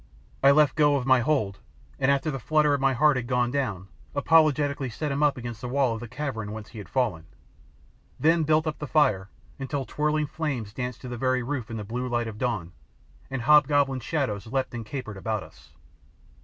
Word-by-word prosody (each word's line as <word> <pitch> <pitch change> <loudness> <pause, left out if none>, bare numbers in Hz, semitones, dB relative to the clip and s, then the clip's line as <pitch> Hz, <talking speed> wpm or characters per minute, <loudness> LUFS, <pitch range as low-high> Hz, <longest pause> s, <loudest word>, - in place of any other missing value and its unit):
I 135 - +6
left 150 0 +5
go 145 -2 +3
my 130 0 +5
hold, 115 -7 0 0.4
and 130 - +2
after 140 +2 +1
the 135 - -4
flutter 150 +5 +2
in 140 - 0
my 135 0 +3
heart 150 +2 +4
had 125 -2 -3
gone 125 -1 +1
down, 105 -10 -2 0.3
apologetically 145 -3 +3
set 150 +5 -3
him 140 +1 -1
up 150 -2 +3
against 120 -2 -7
the 125 - -4
wall 130 -2 +2
of 115 - -5
the 120 - -7
cavern 110 -6 -4
whence 110 0 -8
he 115 - -10
had 100 - -10
fallen; 105 -11 -1 0.9
then 165 +2 +4
built 155 +1 +2
up 155 -1 -3
the 150 - -5
fire 105 -11 +2 0.3
until 135 0 -3
twirling 150 +2 0
flames 140 -9 -4
danced 125 0 -5
to 130 - -8
the 120 -1 -5
very 130 +1 +1
roof 130 -3 -4
in 115 - -5
the 105 - -4
blue 120 +5 -4
light 120 -1 -1
of 105 -1 -7
dawn, 110 -9 -2 0.6
and 135 -3 -4
hobgoblin 145 -1 +4
shadows 120 -6 -2
leapt 130 +2 -2
and 115 -2 -6
capered 115 -6 -6
about 110 0 -2
us. - - -18
130 Hz, 205 wpm, -26 LUFS, 115-145 Hz, 0.9 s, I